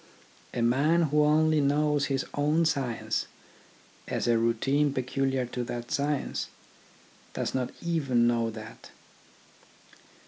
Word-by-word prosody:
A 120 Hz, -, -1 dB
man 145 Hz, +8 st, +3 dB
who 150 Hz, -1 st, +3 dB
only 155 Hz, +1 st, +3 dB
knows 145 Hz, 0 st, +2 dB
his 135 Hz, -1 st, -1 dB
own 150 Hz, +3 st, +2 dB
science, 135 Hz, -7 st, -1 dB, 0.8 s
as -, -, -2 dB
a 120 Hz, -, +4 dB
routine 135 Hz, +6 st, +1 dB
peculiar 130 Hz, 0 st, -1 dB
to 125 Hz, 0 st, -4 dB
that 120 Hz, 0 st, -6 dB
science, 145 Hz, 0 st, -1 dB, 0.9 s
does -, -, -2 dB
not 130 Hz, -2 st, -1 dB
even 140 Hz, -8 st, +1 dB
know 115 Hz, -1 st, +2 dB
that. 110 Hz, 0 st, -10 dB
135 Hz, 115 wpm, -28 LUFS, 120-150 Hz, 0.9 s, a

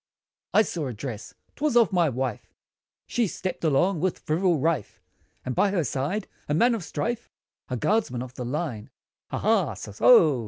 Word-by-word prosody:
] -, -, -54 dB
I 215 Hz, -, +7 dB
saw 165 Hz, -7 st, -3 dB
a 125 Hz, -, -4 dB
dress! 115 Hz, -1 st, -7 dB, 0.2 s
'twas 290 Hz, -4 st, +1 dB
of 230 Hz, -4 st, +4 dB
my 175 Hz, -4 st, +3 dB
wife, 130 Hz, -3 st, -4 dB, 0.5 s
She 235 Hz, -3 st, 0 dB
stepped 185 Hz, 0 st, -5 dB
along 165 Hz, +4 st, +2 dB
with 185 Hz, +2 st, 0 dB
frivol 170 Hz, +1 st, +2 dB
rife, 160 Hz, -5 st, -1 dB, 0.5 s
And 130 Hz, -, -2 dB
by 200 Hz, -, +3 dB
her 190 Hz, -4 st, +1 dB
side, 150 Hz, +10 st, -2 dB, 0.2 s
a 150 Hz, -, +2 dB
man 240 Hz, +8 st, +4 dB
of 220 Hz, -6 st, -3 dB
strife 235 Hz, +10 st, -3 dB, 0.4 s
A 125 Hz, -, -2 dB
guardsman 130 Hz, -, 0 dB
of 130 Hz, -1 st, -10 dB
the 125 Hz, -, -6 dB
line. 125 Hz, -3 st, -3 dB, 0.4 s
Ha -, -, -4 dB
ha! 195 Hz, -, +2 dB
165 Hz, 170 wpm, -26 LUFS, 130-200 Hz, 0.5 s, I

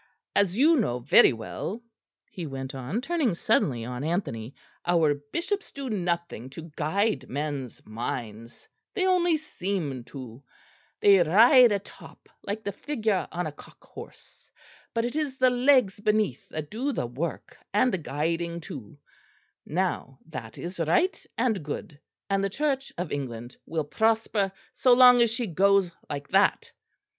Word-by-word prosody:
As 200 Hz, -1 st, +2 dB
you 310 Hz, +5 st, +5 dB
know 160 Hz, -, +1 dB
very 125 Hz, +3 st, +6 dB
well," 115 Hz, -, -5 dB, 0.5 s
he 180 Hz, -7 st, -6 dB
went 135 Hz, -1 st, -6 dB
on, 135 Hz, -, -3 dB
turning 280 Hz, -, 0 dB
suddenly 120 Hz, -8 st, +1 dB
on 125 Hz, +2 st, -5 dB
Anthony, 140 Hz, -, -3 dB, 0.3 s
"our 165 Hz, -4 st, +3 dB
bishops 340 Hz, -, -4 dB
do 275 Hz, -3 st, -5 dB
nothing 170 Hz, -, -2 dB
to 165 Hz, 0 st, -8 dB
guide 160 Hz, -2 st, 0 dB
men's 140 Hz, -3 st, -4 dB
minds; 115 Hz, 0 st, -6 dB, 0.3 s
they 375 Hz, -3 st, +1 dB
only 350 Hz, -3 st, +3 dB
seem 180 Hz, -, -4 dB
to: 125 Hz, -3 st, -10 dB, 0.6 s
they 200 Hz, -1 st, +7 dB
ride 230 Hz, -, +7 dB
atop 200 Hz, -1 st, -6 dB
like 210 Hz, +2 st, -4 dB
the 200 Hz, -, -2 dB
figure 220 Hz, -4 st, -1 dB
on 175 Hz, +1 st, -2 dB
a 155 Hz, -, -3 dB
cock 145 Hz, -, -17 dB
horse, -, -, -13 dB, 0.5 s
but 230 Hz, 0 st, +1 dB
it 245 Hz, -, -3 dB
is 295 Hz, -4 st, -2 dB
the 255 Hz, -1 st, +4 dB
legs 250 Hz, -5 st, +3 dB
beneath 210 Hz, -, 0 dB
that 155 Hz, -1 st, -6 dB
do 260 Hz, +6 st, -1 dB
the 225 Hz, -, -2 dB
work 140 Hz, +8 st, -5 dB, 0.2 s
and 225 Hz, +5 st, +3 dB
the 190 Hz, -, 0 dB
guiding 165 Hz, +3 st, -2 dB
too: 140 Hz, -7 st, -9 dB, 0.7 s
now 170 Hz, -6 st, -2 dB
that 160 Hz, -, -8 dB
is 175 Hz, +1 st, -7 dB
right 170 Hz, -, +1 dB
and 225 Hz, -5 st, +1 dB
good; 150 Hz, +1 st, -6 dB, 0.3 s
and 195 Hz, 0 st, +1 dB
the 195 Hz, -, +1 dB
Church 275 Hz, +3 st, -1 dB
of 175 Hz, -1 st, -3 dB
England 120 Hz, -4 st, -5 dB
will 160 Hz, 0 st, -1 dB
prosper 220 Hz, +4 st, +1 dB, 0.2 s
so 255 Hz, -, +4 dB
long 250 Hz, -1 st, +8 dB
as 235 Hz, -, +4 dB
she 235 Hz, +1 st, -1 dB
goes 195 Hz, 0 st, +3 dB, 0.2 s
like 140 Hz, -1 st, -5 dB
that. -, -, +2 dB
180 Hz, 150 wpm, -27 LUFS, 145-230 Hz, 0.7 s, long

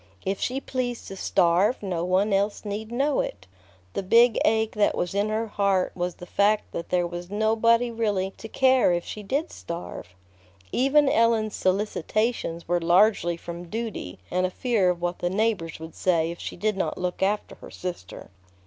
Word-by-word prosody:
If 195 Hz, 0 st, -1 dB
she 255 Hz, +2 st, -1 dB
pleased 250 Hz, -3 st, -4 dB
to 195 Hz, -, -7 dB
starve, 185 Hz, +5 st, +2 dB
no 180 Hz, -4 st, -2 dB
one 190 Hz, +3 st, +2 dB
else 200 Hz, +2 st, 0 dB
need 210 Hz, +2 st, -4 dB
know 275 Hz, +4 st, +1 dB
it. 95 Hz, -2 st, -4 dB, 0.5 s
The -, -, -1 dB
big 230 Hz, +4 st, +5 dB
ache 220 Hz, 0 st, +2 dB
that 210 Hz, -1 st, +2 dB
was 175 Hz, -, -1 dB
in 200 Hz, +2 st, +1 dB
her 220 Hz, +1 st, -1 dB
heart 200 Hz, -3 st, +1 dB
was 175 Hz, -1 st, -3 dB
the 180 Hz, -, -10 dB
fact 205 Hz, +3 st, +1 dB
that 170 Hz, -, -5 dB
there 180 Hz, -1 st, +2 dB
was 175 Hz, +1 st, -6 dB
nobody 225 Hz, +3 st, +2 dB
really 205 Hz, -4 st, -1 dB
to 220 Hz, -, -8 dB
care 260 Hz, -5 st, +4 dB
if 175 Hz, 0 st, -1 dB
she 215 Hz, -, -6 dB
did 275 Hz, -, -2 dB
starve. 170 Hz, -, -7 dB, 0.6 s
Even 275 Hz, +3 st, +3 dB
Ellen's 225 Hz, -4 st, +2 dB
solicitations 200 Hz, -1 st, -1 dB
were 175 Hz, +1 st, +2 dB
largely 175 Hz, 0 st, +3 dB
from 170 Hz, 0 st, -8 dB
duty 220 Hz, -, -5 dB
and 185 Hz, +1 st, +1 dB
a -, -, -5 dB
fear 210 Hz, -2 st, +1 dB
of 175 Hz, -1 st, -2 dB
what 175 Hz, 0 st, -2 dB
the 175 Hz, -, 0 dB
neighbors 195 Hz, -5 st, -1 dB
would 160 Hz, 0 st, -9 dB
say 165 Hz, -3 st, +1 dB
if 170 Hz, -, -9 dB
she -, -, -6 dB
did 210 Hz, +3 st, 0 dB
not 165 Hz, -5 st, -2 dB
look 180 Hz, 0 st, -3 dB
after 205 Hz, +2 st, 0 dB
her -, -, -10 dB
sister. 175 Hz, -, -7 dB
200 Hz, 185 wpm, -25 LUFS, 175-225 Hz, 0.6 s, big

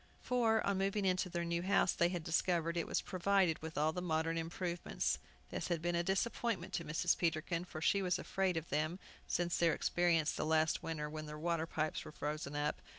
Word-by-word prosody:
For, 230 Hz, -3 st, +2 dB
on 200 Hz, -1 st, +1 dB
moving 195 Hz, +1 st, 0 dB
into 185 Hz, 0 st, +1 dB
their 170 Hz, -1 st, -2 dB
new 170 Hz, 0 st, 0 dB
house, 190 Hz, 0 st, +3 dB
they 170 Hz, -, +3 dB
had 175 Hz, -2 st, -3 dB
discovered 170 Hz, 0 st, +1 dB
it 170 Hz, -, -1 dB
was -, -, 0 dB
provided 185 Hz, -2 st, +2 dB
with 160 Hz, +1 st, -6 dB
all 155 Hz, +2 st, +2 dB
the 180 Hz, -, -3 dB
modern 165 Hz, -1 st, 0 dB
improvements. 170 Hz, -, -2 dB, 0.3 s
This -, -, -3 dB
had 170 Hz, -2 st, 0 dB
been 175 Hz, +2 st, -1 dB
a 170 Hz, -, +2 dB
disappointment 200 Hz, +4 st, -1 dB
to 170 Hz, -, -1 dB
Mrs. 160 Hz, +3 st, +1 dB
Peterkin, 165 Hz, +1 st, -1 dB
for 155 Hz, -3 st, -7 dB
she 200 Hz, +5 st, +3 dB
was 180 Hz, -2 st, +1 dB
afraid 190 Hz, -2 st, 0 dB
of 160 Hz, 0 st, -4 dB
them, 155 Hz, +4 st, 0 dB, 0.3 s
since 175 Hz, -1 st, 0 dB
their 170 Hz, -1 st, +4 dB
experience 170 Hz, -3 st, +2 dB
the -, -, -2 dB
last 160 Hz, 0 st, +2 dB
winter, 155 Hz, -2 st, -3 dB
when 155 Hz, 0 st, -6 dB
their 150 Hz, 0 st, -6 dB
water 165 Hz, 0 st, -1 dB
pipes 155 Hz, -1 st, -2 dB
were -, -, -9 dB
frozen 150 Hz, -1 st, -4 dB
up. 145 Hz, 0 st, -1 dB
170 Hz, 210 wpm, -36 LUFS, 155-180 Hz, 0.3 s, their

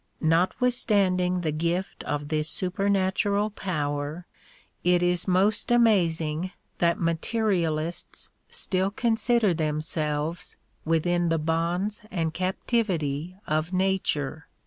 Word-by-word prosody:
Notwithstanding 185 Hz, 0 st, +2 dB
the 160 Hz, -3 st, 0 dB
gift 170 Hz, +5 st, -2 dB
of 145 Hz, 0 st, -3 dB
this 155 Hz, 0 st, 0 dB
supernatural 200 Hz, +2 st, +1 dB
power, 150 Hz, -3 st, -3 dB, 0.6 s
it 180 Hz, 0 st, +3 dB
is 175 Hz, +1 st, +1 dB
most 190 Hz, +3 st, +2 dB
amazing 180 Hz, -8 st, +2 dB, 0.3 s
that 170 Hz, -1 st, +2 dB
materialists 170 Hz, -2 st, -1 dB, 0.2 s
still 190 Hz, 0 st, 0 dB
consider 225 Hz, -1 st, +2 dB
themselves 155 Hz, +1 st, -2 dB, 0.3 s
within 170 Hz, +2 st, +1 dB
the 165 Hz, -, +2 dB
bonds 170 Hz, +6 st, -1 dB
and 165 Hz, -4 st, -1 dB
captivity 185 Hz, -, -1 dB
of 155 Hz, +4 st, -1 dB
nature. 185 Hz, -6 st, -1 dB
175 Hz, 95 wpm, -26 LUFS, 160-195 Hz, 0.6 s, it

